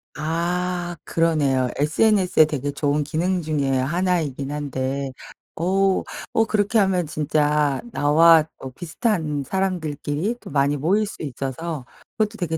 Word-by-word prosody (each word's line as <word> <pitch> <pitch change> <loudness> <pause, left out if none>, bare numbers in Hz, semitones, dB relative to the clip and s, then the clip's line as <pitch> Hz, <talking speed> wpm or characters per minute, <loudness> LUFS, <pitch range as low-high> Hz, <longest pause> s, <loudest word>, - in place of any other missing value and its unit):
아 175 +3 -2
그러네요. 145 -6 +1
sns의 180 +3 +3
되게 145 -2 -3
좋은 145 +1 0
기능 175 +4 0
중에 150 -4 -1
하나이긴 155 -2 -1
한데 140 -2 -3 0.4
오 190 +3 +1 0.3
오 225 - +3
그렇게 215 +1 +1
하면 190 -3 +2
진짜 150 -1 +1
나와 160 +2 +5
어 130 - -8
비슷한 160 - -2
사람들끼리 175 - -2
또 - - -10
많이 140 0 +2
모일 185 +10 +1
수 - - -9
있어서 140 +1 -4 0.3
그것도 215 0 0
되게 165 -4 -2
155 Hz, 270 characters per minute, -22 LUFS, 145-180 Hz, 0.4 s, 나와